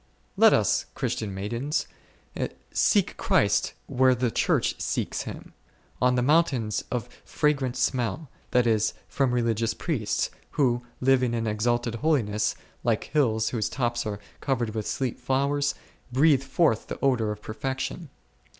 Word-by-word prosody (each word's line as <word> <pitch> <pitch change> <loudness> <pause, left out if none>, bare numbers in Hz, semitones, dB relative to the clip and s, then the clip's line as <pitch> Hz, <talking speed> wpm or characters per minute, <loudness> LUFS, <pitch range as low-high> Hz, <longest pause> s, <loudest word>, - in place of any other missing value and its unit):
Let - - +7
us, - - +2
Christian 105 -2 -2
maidens, 115 +9 -2 0.9
seek - - +2
Christ - - +2
where 130 0 +3
the 120 -1 0
Church - - +1
seeks - - -1
Him, - - -10 0.5
on 125 0 +4
the 125 - +2
mountains 135 -7 +2
of 120 -1 -2 0.2
fragrant 140 -4 0
smell, 130 +3 -1 0.2
that 125 -1 +3
is, 110 -2 +2
from 135 -3 +1
religious 115 -2 0
priests, 130 -12 -1 0.2
who, 120 -4 +2 0.2
living 125 -2 +3
in 115 -1 -1
exalted 120 +2 0
holiness, 110 -9 +1 0.3
like 115 -3 +1
hills 110 -7 +2
whose 110 -4 -1
tops 120 -2 -1
are 100 -1 -4 0.2
covered 120 -5 -1
with 110 -1 -4
sweet 130 -3 -2
flowers, 140 +2 0 0.4
breathe 140 +1 +4
forth 130 -3 +1
the - - -5
odour 120 -6 +2
of 105 0 -7
perfec 130 +5 -3
tion. 165 -5 -5
125 Hz, 140 wpm, -26 LUFS, 110-135 Hz, 0.9 s, Let